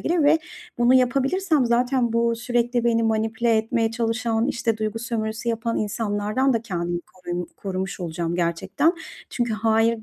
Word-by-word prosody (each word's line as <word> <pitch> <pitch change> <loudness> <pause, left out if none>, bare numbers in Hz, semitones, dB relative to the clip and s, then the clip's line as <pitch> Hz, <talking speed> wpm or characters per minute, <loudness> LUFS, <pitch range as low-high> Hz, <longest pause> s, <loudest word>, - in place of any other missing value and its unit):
gelir 335 -2 +1
ve 305 +2 +5 0.4
bunu 240 +2 +5
yapabilirsem 275 +5 +2
zaten 245 0 +1
bu 230 0 +2
sürekli 240 0 0
beni 230 -1 +2
manipüle 225 +1 +1
etmeye 225 +1 +1
çalışan, 230 0 0
işte, 235 -4 0
duygu 215 +1 -2
sömürüsü 225 0 -3
yapan 230 0 -1
insanlardan 210 +4 0
da 230 -1 0
kendimi 175 -5 -3
korum 175 -1 -4
korumuş 190 0 -4
olacağım 170 0 -3
gerçekten. 170 - +1 0.4
Çünkü 240 -2 -1
hayır 225 +1 +2
230 Hz, 145 wpm, -23 LUFS, 215-240 Hz, 0.4 s, ve